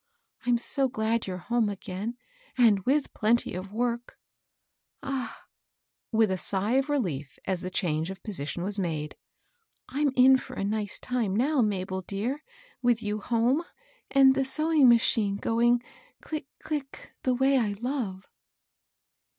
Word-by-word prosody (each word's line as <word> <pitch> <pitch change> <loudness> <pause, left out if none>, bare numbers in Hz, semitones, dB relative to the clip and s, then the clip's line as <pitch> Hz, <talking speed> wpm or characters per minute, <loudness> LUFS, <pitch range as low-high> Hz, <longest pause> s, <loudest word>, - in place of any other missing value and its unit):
I'm 240 -1 +4
so 270 +3 0
glad 220 -1 -1
you're 185 -1 -3
home 230 +3 0
again, 200 +3 -5 0.4
and 225 -5 +5
with 285 +2 +1
plenty 230 +2 +1
of 185 +2 -6
work 235 +2 -2 0.9
I - - -7
Ah 255 -4 -4
I" - - -34 0.7
with 220 -3 +4
a 185 - -1
sigh 200 +4 +1
of 270 +2 0
relief, 160 - -2
as 185 -2 -1
the 185 - -4
change 165 -3 -1
of 190 0 -8
position 175 -4 -3
was 200 +2 0
made, 155 -5 -3 0.4
" 465 -2 -30
I'm 285 +1 +1
in 260 +1 +7
for - - -9
a - - -3
nice 210 0 -2
time 235 -6 -1
now, 270 +5 +2
Mabel 190 -3 -1
dear 205 +9 -3
I - - -40 0.3
with 240 -2 +2
you 210 0 -2
home, 240 +7 +1 0.5
and 270 -1 +6
the 270 0 +1
sewing 305 0 +4
ma 235 - +8
chine 210 -3 +1
going 235 +3 +2 0.4
click, 305 -4 -5 0.2
click, 295 -3 -5
the 255 -1 +1
way 265 +1 +3
I 210 -4 0
love." 220 -4 -4
230 Hz, 160 wpm, -28 LUFS, 195-260 Hz, 0.9 s, ma